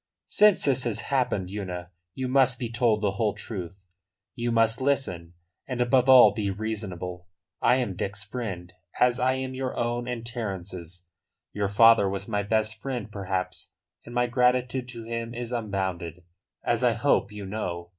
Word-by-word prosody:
"Since 210 -2 +4
this 135 -2 +2
has 115 -1 -1
happened, 125 -10 -1
Una, 90 -3 -5 0.2
you 130 -1 -2
must 130 -1 +3
be 120 -2 -4
told 115 -3 +2
the 100 -2 +1
whole 105 -2 +1
truth; 95 -2 -7 0.5
you 120 -1 -2
must 115 +1 +3
listen, 90 -12 -1 0.3
and, 130 -2 -4
above 125 +1 +3
all, 125 -6 +9
be 105 -2 -2
reasonable. 95 -4 -5 0.3
I 125 - +5
am 120 -7 -1
Dick's 100 +2 -3
friend, 95 -6 -6 0.3
as 125 0 +3
I 130 +1 +3
am 130 0 -3
your 130 -1 -4
own 120 +1 -1
and 120 -2 -4
Terence's. 95 -6 -6 0.5
Your 100 -1 0
father 110 0 +6
was 100 0 -3
my 105 -3 0
best 110 +1 0
friend, 125 -6 -4
perhaps, 95 -2 -4 0.3
and 120 - -10
my 120 0 +3
gratitude 125 +1 +1
to 115 -2 -7
him 115 +1 -4
is 120 0 -5
unbounded, 95 -7 -3 0.4
as 120 +1 0
I 120 -2 +4
hope 110 -3 +1
you 105 -1 -7
know. 90 -4 -4
115 Hz, 165 wpm, -26 LUFS, 95-125 Hz, 0.5 s, all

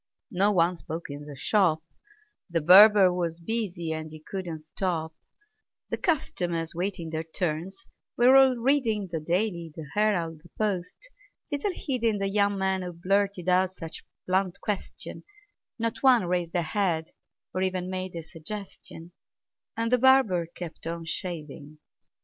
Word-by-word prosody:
No 200 +2 +3
one 175 -2 +3
spoke 160 -1 -6
in 145 +1 -8
the 145 - -8
shop: 160 - +2 0.7
The 170 -1 +1
barber 190 +3 +8
was 170 -2 -2
busy, 175 -4 -2
and 155 0 -5
he 155 0 -10
couldn't 170 -1 -6
stop; 160 -1 -3 0.8
The - - -2
customers, 175 - -1
waiting 175 -2 -3
their 160 0 -2
turns, 175 +5 -4 0.3
were 250 +2 +6
all 265 -1 +7
reading 235 -6 +1
The 165 - -2
"Daily," 170 0 -1
the 160 -3 -8
"Herald," 175 -7 0
the 170 - -18
"Post," 200 - -2 0.4
little 285 +7 -1
heeding 235 -9 -1
The 195 0 -1
young 200 0 +2
man 190 0 0
who 180 -1 -5
blurted 195 +1 0
out 185 0 +3
such 165 -3 -8
a - - -21 0.2
blunt 185 0 0
question; 205 -2 -4 0.5
Not 230 -1 -2
one 250 -7 +5
raised 175 -1 -1
a 175 - +2
head, 165 -3 0 0.4
or 185 - -1
even 185 -1 -1
made 185 -1 -4
a 165 - -5
suggestion; 170 0 -9 0.7
And 230 +1 -1
the 250 - +4
barber 235 -10 +4
kept 170 -1 -8
on 165 0 -4
shaving. 155 -3 -6
180 Hz, 150 wpm, -27 LUFS, 165-205 Hz, 0.8 s, barber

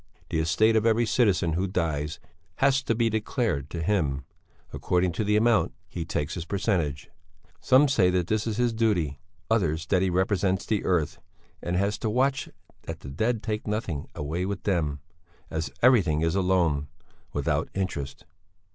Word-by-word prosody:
The 80 - +1
estate 85 +8 +3
of 110 - +3
every 115 +1 +3
citizen 100 -8 +2
who 90 +4 0
dies 80 -5 -2 0.4
has 135 0 +3
to 115 - +1
be 115 0 +2
declared 110 - -1
to 85 -1 -4
him; 75 -9 0 0.5
according 90 0 +1
to 85 - -2
the 105 0 +2
amount 115 +1 +3
he 85 -1 -5
takes 75 -2 -2
his 90 - -4
percentage; 85 -7 -1 0.5
some 135 +3 +5
say 105 -10 +3
that 90 -1 +1
this 110 +4 -1
is 110 -1 -2
his 120 -1 +2
duty; 90 -11 0 0.3
others 85 -8 +1
that 90 0 +2
he 95 - +2
represents 95 +1 +1
the 110 -3 0
Earth, 85 -5 0 0.4
and 85 - -2
has 100 +3 0
to 110 - -1
watch 135 +5 +1 0.4
that - - -6
the 70 - -8
dead 110 - -1
take 110 -1 -3
nothing 100 -9 -3
away 80 +5 -3
with 100 +2 -3
them, 75 -8 0 0.5
as 80 -2 -2
everything 95 -12 +4
is 80 0 +1
a 95 - +2
loan 85 -6 +1 0.4
without - - -1
interest. 85 -8 -4
95 Hz, 170 wpm, -26 LUFS, 80-110 Hz, 0.5 s, some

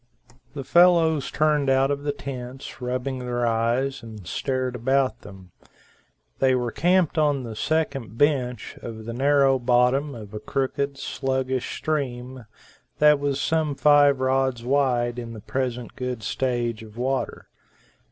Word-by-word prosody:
The 140 - -4
fellows 165 -2 +4
turned 150 -2 +1
out 135 +1 +3
of 140 0 -2
the 145 0 -1
tents, 130 -2 -8
rubbing 130 +1 -3
their 120 -1 -2
eyes, 120 +4 0
and 110 -4 -10
stared 130 +5 -2
about 130 +2 +1
them. 95 -3 -13 0.9
They 130 -1 +3
were 120 -2 -1
camped 175 0 +2
on 145 -3 +2
the 115 -2 -7
second 140 -5 -2
bench 130 -4 0
of 110 -2 -8
the 115 - -5
narrow 135 +1 +3
bottom 125 +3 +2
of 110 -2 -10
a 105 - -4
crooked, 140 +3 -2
sluggish 130 -2 -2
stream, 130 -5 -3 0.5
that 150 -1 +5
was 140 -1 -1
some 155 -1 0
five 145 -2 +5
rods 130 -2 +1
wide 125 -3 +1
in 115 -1 -7
the 110 - -8
present 125 -1 -3
good 125 -3 -4
stage 120 -1 -1
of 110 0 -13
water. 130 +2 -2
130 Hz, 140 wpm, -24 LUFS, 120-140 Hz, 0.9 s, that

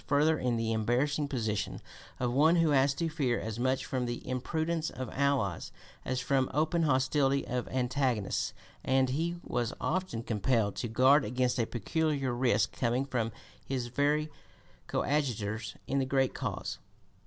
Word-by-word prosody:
254) 150 +2 +4
further 125 - -2
in 120 - +1
the 115 0 -1
embarrassing 130 +7 +1
position 110 -7 -2 0.4
of 120 -1 0
one 155 +6 +5
who 165 -3 +3
has 135 0 +4
to 165 +3 -1
fear 140 -7 0
as 110 +1 -5
much 130 +1 +1
from 125 -2 -2
the 120 0 -5
imprudence 160 +6 -1
of 130 0 -6
allies 135 - 0 0.3
as 130 -1 -1
from 130 0 +1
open 160 +3 +2
hostility 140 -1 +2
of 125 -1 -2
antagonists, 125 -4 0 0.3
and 130 0 +2
he 165 +5 -1
was 120 -2 -2
often 180 -10 -2
compelled 110 -1 +1
to 120 - -3
guard 130 +6 +5
against 125 +2 0
a 115 - +1
peculiar 140 +2 -1
risk 120 -4 +1
coming 125 +2 0
from 120 -4 -1 0.3
his 125 -3 -3
very 150 +4 +1 0.6
coadjutors 110 -7 -1
in 140 - 0
the 135 - +1
great 135 -1 +2
cause. - - -4
130 Hz, 155 wpm, -31 LUFS, 120-145 Hz, 0.6 s, one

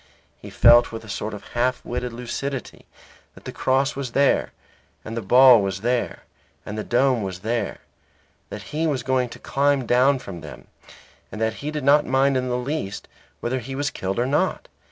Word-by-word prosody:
He - - -10
felt 120 +1 +6
with 115 0 -7
a - - -13
sort 105 +1 -4
of 100 - -12
half 125 +1 -1
witted 125 0 -3
lucidity 125 +3 -6 0.5
that - - -16
the - - -5
cross 135 +2 0
was 135 -3 -5
there, 140 0 +2 0.5
and 110 - -6
the 115 - -2
ball 125 +3 +7
was 95 -1 -3
there, 120 +1 -1 0.4
and 105 - -6
the 110 - -3
dome 125 0 +2
was 95 -2 -5
there, 115 -1 -2 0.7
that - - -7
he 160 +2 0
was 135 -6 -1
going 130 -1 0
to - - -10
climb 140 -1 0
down 130 +4 +3
from 95 -9 -9
them, - - -11 0.7
and 110 - -7
that 110 0 -1
he 145 - -3
did 150 -2 -4
not 145 +2 +5
mind 135 +1 +2
in 130 0 -1
the 125 - 0
least 125 -6 -4 0.3
whether 130 +2 -1
he 135 +3 -7
was 145 0 -1
killed 95 +1 -4
or 120 - +1
not. 140 +3 0
125 Hz, 195 wpm, -23 LUFS, 115-135 Hz, 0.7 s, ball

